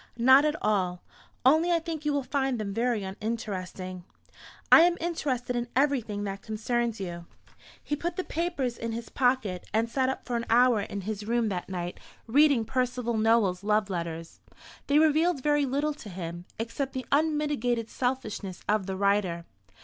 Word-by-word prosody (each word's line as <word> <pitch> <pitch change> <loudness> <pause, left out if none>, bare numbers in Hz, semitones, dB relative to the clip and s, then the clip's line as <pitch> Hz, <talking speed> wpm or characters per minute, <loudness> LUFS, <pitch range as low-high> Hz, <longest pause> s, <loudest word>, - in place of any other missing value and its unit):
"Not 260 +4 +6
at 305 0 +1
all. 185 -4 0 0.4
Only 315 +6 +5
I 340 - +4
think 325 -2 -5
you 300 - +2
will 285 -1 0
find 265 -1 -1
them 200 -2 -3
very 230 -1 0
uninteresting." 190 -3 -5 0.7
"I - - +10
am 345 +1 +4
interested 265 -7 -2
in 240 0 -1
everything 250 -7 +1
that 195 -1 -4
concerns 230 +1 -2
you." 170 -3 -6 0.6
He 295 - -1
put 340 +4 -3
the 370 - -2
papers 310 -9 -2
in 230 0 -3
his 230 +1 -6
pocket, 245 -9 0
and 225 +1 +2
sat 260 +2 0
up 265 - -4
for 245 - -3
an 235 0 -2
hour 240 -1 +5
in 200 0 -5
his 210 +1 -5
room 235 -1 +1
that 180 -2 -4
night 175 -1 -4 0.3
reading 275 -1 +4
Percival 250 -1 -1
Nowell's 215 -4 +2
love 210 -1 +1
letters. 165 -2 -5 0.5
They 285 - +3
revealed 315 -1 +3
very 295 -1 +2
little 290 +3 0
to 240 -7 -11
him, 175 -1 -6
except 260 +4 -3
the 260 -1 -4
unmitigated 290 -6 +1
selfishness 225 -8 -3
of 210 -2 +1
the 190 - -2
writer. 195 -4 +1
235 Hz, 170 wpm, -28 LUFS, 200-280 Hz, 0.7 s, I